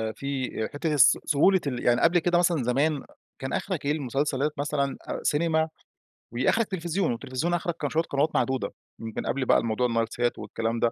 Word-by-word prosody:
في 140 -2 -3 0.2
حتّة 155 +2 -1
الس 145 - +6
سهولة 185 +6 +4
ال 125 -3 -3
يعني 120 0 +3
قبل 175 +1 +4
كده 175 +1 +2
مثلًا 175 -5 +2
زمان 140 +4 +1 0.4
كان 130 - -4
آخرك 180 -8 -2
إيه 145 - +2
المسلسلات 145 0 0
مثلًا 140 -1 -1 0.3
سينما 160 +1 +1 0.6
وآخرك 130 - +1
تلفزيون، 175 -3 -1
والتلفزيون 130 +8 -2
آخرك 175 -1 -1
كان 145 - -1
شويّة 160 +3 +1
قنوات 140 +1 +1
معدودة، 130 -1 0 0.3
من 115 -1 -5
قبل 135 0 -1
بقى - - +5
الموضوع 115 +2 0
النايل 115 -1 0
سات 120 +1 -1
والكلام 115 +2 -3
ده 115 - +2
140 Hz, 175 wpm, -26 LUFS, 125-160 Hz, 0.6 s, الس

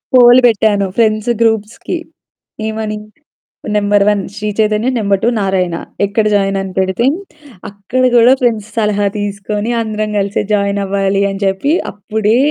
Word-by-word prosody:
Pole 245 0 +7
బెట్టాను 210 -3 +2
friends 215 0 +1
గ్రూప్స్‌కి. 225 - -1 0.7
ఏమని? 215 -1 -4 0.8
Number 205 -1 +3
1 205 -1 +1
Shri 210 - -3
Chaitanya. 215 +3 +1
Number 200 -2 +1
2 235 - +4
Narayana. 185 -3 0 0.3
ఎక్కడ 210 +2 0
join? 195 -1 +1
అని 195 -1 -6
పెడితే, 190 +5 0 0.6
అక్కడ 200 +5 -3
గూడా 240 +2 +6
ఫ్రెండ్స్ 225 -4 0
సలహా 210 -2 +1
తీసుకొని, 205 +2 -3
అందరం 215 -1 -3
గలిసే 200 0 -1
జాయిన్ 200 0 0
అవ్వాలి 195 0 0
అని 195 +1 -6
జెప్పి, 195 +10 0 0.2
అప్పుడే 215 +2 -1
210 Hz, 135 wpm, -14 LUFS, 200-220 Hz, 0.8 s, Pole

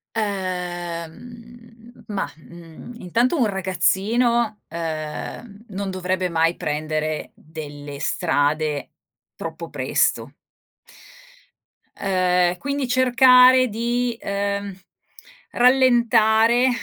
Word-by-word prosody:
Ehm, 205 +5 -6
ma, 205 -2 -3
mhmm, 165 +6 -13
intanto 235 - +1
un 250 - +3
ragazzino, 215 +4 0
ehm, 165 +7 -6
non 195 0 -4
dovrebbe 185 0 -2
mai 165 0 +1
prendere 155 +1 -3
delle 145 -2 -9
strade 150 -3 0 0.4
troppo - - -7
presto. - - 0 1.6
Ehm, 180 -2 +1
quindi 280 +5 -3
cercare 255 0 +6
di, 235 +2 -1
ehm, 200 0 -3 0.8
rallentare 240 -2 +4
200 Hz, 75 wpm, -22 LUFS, 170-235 Hz, 1.6 s, cercare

